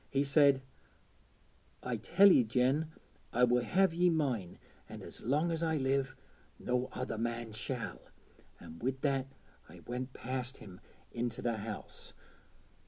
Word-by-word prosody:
He 135 +1 +1
said, 140 -1 +4 1.2
"I 125 -2 -2
tell 190 - +6
ye, 130 - +6
Jen, 130 +7 +1 0.4
I 125 - +2
will 125 0 +4
have 185 +7 +3
ye 175 +1 +4
mine, 130 - -1 0.3
an' - - -8
as - - -8
long 150 +8 +1
as 165 0 -1
I 160 -1 +1
live 135 -1 0 0.4
no 125 +1 -1
other 120 -4 -4
man 115 0 -2
shall," 115 +2 -4 0.6
an' 80 - -11
wi' 130 +2 -1
that 135 -2 +1 0.4
I - - -13
went 125 +2 -5
past 130 +1 -4
him 90 -3 -12 0.3
into 120 -1 -3
the 115 -2 0
house.' 105 0 -7
130 Hz, 145 wpm, -33 LUFS, 120-145 Hz, 1.2 s, tell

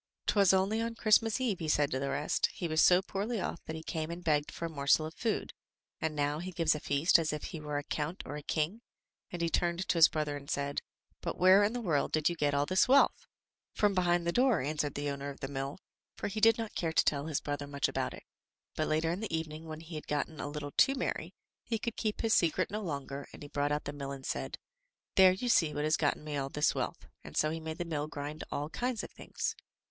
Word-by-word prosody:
*"Twas 200 -3 +5
only 195 +4 +2
on 230 0 -2
Christmas 225 0 +3
eve," 230 -8 0
he 160 - -3
said 145 -1 +2
to 130 - 0
the 140 +1 -2
rest, 150 - +1
"he 175 - -5
was 160 0 +2
so 180 +1 +6
poorly 205 +4 -2
off 170 - -4
that 160 - -4
he 160 - -7
came 160 -1 -3
and 170 +1 -6
begged 150 -2 +1
for 170 - -5
a - - 0
morsel 150 0 +2
of 160 - -6
food, 225 +4 -2 0.5
and 160 -1 -2
now 145 +1 0
he 185 +2 -5
gives 165 -3 +2
a 150 - -3
feast 145 +5 +3
as 160 -2 0
if 150 -1 -4
he 165 - -5
were 150 -1 -3
a 145 - -2
count 155 +5 -3
or 145 - -6
a 150 - -5
king," 160 +9 -1 0.5
and 175 -1 -3
he 165 - +2
turned 175 +3 0
to - - +1
his 160 - +10
brother 150 -2 -2
and 140 0 -9
said, 140 -2 -1 0.4
"But - - -3
where 185 +2 +7
in 210 +3 +1
the 245 - -3
world 160 -9 +1
did 155 0 +2
you 175 - -3
get 145 -3 +1
all 140 0 +2
this 185 +4 +3
wealth?" 275 +2 +4 0.5
"From 205 -1 +3
behind 175 -2 +2
the 170 - +2
door," 250 -2 +3
answered 150 +1 -2
the 145 0 -2
owner 140 0 -4
of 140 - -9
the 135 - -4
mill, 135 0 -4 0.4
for - - -3
he 215 +2 -3
did 225 0 +6
not 225 -2 -4
care 165 -2 -1
to - - +4
tell 145 0 +1
his 155 -3 0
brother 145 -1 -4
much 140 -1 0
about - - -2
it. - - -13 0.5
But 155 - 0
later 160 +1 +1
in 175 - -2
the 220 - -4
evening, 160 0 -6
when 155 0 -7
he 165 +1 -11
had 155 - -6
gotten 150 +1 -2
a 145 - -3
little 145 -1 -5
too 270 - +4
merry, 260 - -3 0.3
he 230 - -1
could 230 +1 -4
keep 215 -2 -2
his 225 -1 +2
secret 175 +3 +2
no 210 +1 -2
longer, 140 -5 -5
and - - -10
he 145 - -9
brought 145 0 0
out 150 0 -1
the 145 - -4
mill 140 -1 -5
and 135 -1 -7
said: - - -3 0.6
"There 190 -1 +7
you 220 +7 -4
see 160 -10 +3
what 150 - -1
has 155 +1 +3
gotten 150 -1 0
me 150 -1 -3
all 135 -1 -2
this 150 +2 +2
wealth," - - -3 0.2
and 75 - -9
so 155 - +3
he 165 - -3
made 160 0 -5
the 175 - -3
mill 150 -3 -2
grind 150 +1 -6
all 145 +1 -2
kinds 245 +1 -2
of - - -8
things. - - -4
160 Hz, 260 wpm, -32 LUFS, 145-185 Hz, 0.6 s, his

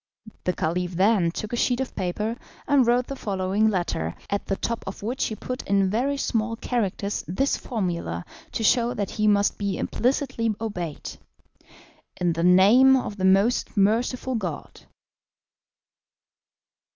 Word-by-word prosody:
The 180 - +1
Caliph 180 +2 -2
then 190 -1 +3
took 215 +6 -5
a - - +2
sheet 245 +1 +1
of 265 - -3
paper, 210 +5 -2 0.3
and 280 -4 +4
wrote 245 +1 +3
the 275 - -6
following 200 -1 0
letter, 170 - -2 0.2
at 200 - -2
the 195 - 0
top 230 +3 -3
of 195 - -7
which 245 +5 -1
he 220 - -3
put 250 +3 -5
in 195 -1 +2
very 265 +6 0
small 230 -3 -1
characters 205 -4 -2
this 270 - 0
formula 170 - -3 0.3
to 225 - -2
show 240 +2 +3
that 200 -2 -3
he 215 -1 0
must 205 -1 +2
be 200 -3 -1
implicitly 245 -4 0
obeyed: 180 -9 -5 1.1
"In 175 -1 +1
the 165 +1 -2
name 205 +9 +6
of 210 -5 -4
the 190 - 0
Most 195 +5 +2
Merciful 235 +6 +1
God. 185 -10 -5
210 Hz, 150 wpm, -25 LUFS, 185-240 Hz, 1.1 s, name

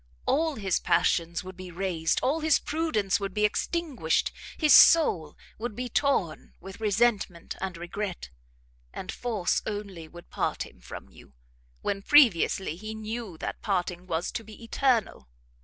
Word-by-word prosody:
All 315 +1 +1
his 195 -6 0
passions 170 0 +1
would 185 0 -9
be 185 0 -9
raised, 170 -2 -1
all 285 +5 +1
his 315 -1 +3
prudence 260 - -1
would 195 -2 -5
be 210 0 +3
extinguished, 260 - 0 0.3
his 305 -2 +5
soul 170 - +6 0.2
would 225 -1 -4
be 250 +1 -4
torn 230 - 0
with 195 +1 -10
resentment 205 -5 0
and 185 -2 -4
regret, 175 - -5 0.6
and 185 - -6
force, 220 -7 -1
only, 200 -6 -5
would 175 +2 -14
part - - -1
him - - -17
from 60 - -10
you, 65 - -17 0.5
when 195 -1 -1
previously 195 - +4
he 215 +3 -7
knew 220 -4 -6
that - - -5
parting 180 -3 -2
was 165 0 -2
to 225 - -5
be 220 +1 -13
eternal. 230 - 0
200 Hz, 150 wpm, -27 LUFS, 175-240 Hz, 0.6 s, soul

